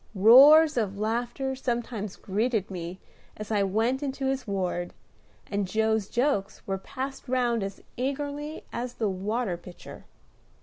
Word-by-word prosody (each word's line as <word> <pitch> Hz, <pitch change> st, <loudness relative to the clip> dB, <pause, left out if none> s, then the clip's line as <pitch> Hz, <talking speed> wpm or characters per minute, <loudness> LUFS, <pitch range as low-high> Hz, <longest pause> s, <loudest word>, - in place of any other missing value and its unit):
Roars 275 Hz, +9 st, +8 dB
of 200 Hz, -4 st, -1 dB
laughter 240 Hz, +5 st, -2 dB
sometimes 235 Hz, -5 st, -3 dB
greeted 210 Hz, 0 st, -1 dB
me 175 Hz, 0 st, -6 dB, 0.4 s
as 215 Hz, 0 st, -7 dB
I 210 Hz, -2 st, +2 dB
went 225 Hz, +7 st, +1 dB
into 275 Hz, -1 st, -3 dB
his 265 Hz, -2 st, -1 dB
ward, 180 Hz, -3 st, -2 dB, 0.5 s
and 200 Hz, -1 st, -2 dB
Joe's 220 Hz, 0 st, 0 dB
jokes 240 Hz, -6 st, -1 dB
were 195 Hz, -1 st, -2 dB
passed 270 Hz, +5 st, -6 dB
round 245 Hz, -3 st, +1 dB
as 195 Hz, 0 st, -6 dB
eagerly 285 Hz, +4 st, -3 dB
as 245 Hz, +1 st, -4 dB
the 220 Hz, -, 0 dB
water 195 Hz, +1 st, -2 dB
pitcher. 175 Hz, 0 st, -12 dB
225 Hz, 135 wpm, -27 LUFS, 195-265 Hz, 0.5 s, Roars